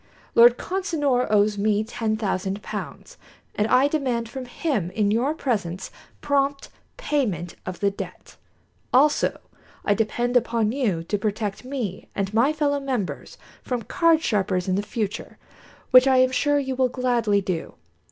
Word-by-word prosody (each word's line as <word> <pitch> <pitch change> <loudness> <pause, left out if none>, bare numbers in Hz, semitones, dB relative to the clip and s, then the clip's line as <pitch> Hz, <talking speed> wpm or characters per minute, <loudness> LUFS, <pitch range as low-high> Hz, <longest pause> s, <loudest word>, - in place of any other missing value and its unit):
Lord 235 +1 +7
Consinor 300 -9 0
owes 205 0 +2
me 210 +1 +2
ten 220 -1 -2
thousand 195 -1 -2
pounds, - - -7 0.4
and 210 - 0
I 255 +4 +4
demand 255 -6 -1
from 260 +1 -6
him 245 - -2
in 205 +2 0
your 255 +8 +1
presence 195 - -2 0.3
prompt 280 -1 0 0.3
payment 225 - -1
of 185 -1 -6
the 200 -1 +2
debt. 195 - -9 0.6
Also, 290 +4 +3 0.5
I 205 - +4
depend 240 +3 -1
upon 230 -3 +2
you 220 -11 -1
to 205 +4 -2
protect 210 0 -3
me 250 -8 -5
and 195 0 -2
my 240 +6 +4
fellow 290 -2 0
members 255 -8 -4 0.2
from 245 -3 -3
card 330 +3 +2
sharpers 190 -4 0
in 185 - +1
the 195 - +1
future, 210 0 -4 0.5
which 255 0 +8
I 260 -1 +4
am 255 0 +4
sure 290 +3 +2
you 265 -2 -1
will 255 -1 +2
gladly 240 -5 +1
do. 185 -4 -4
235 Hz, 150 wpm, -24 LUFS, 205-270 Hz, 0.6 s, which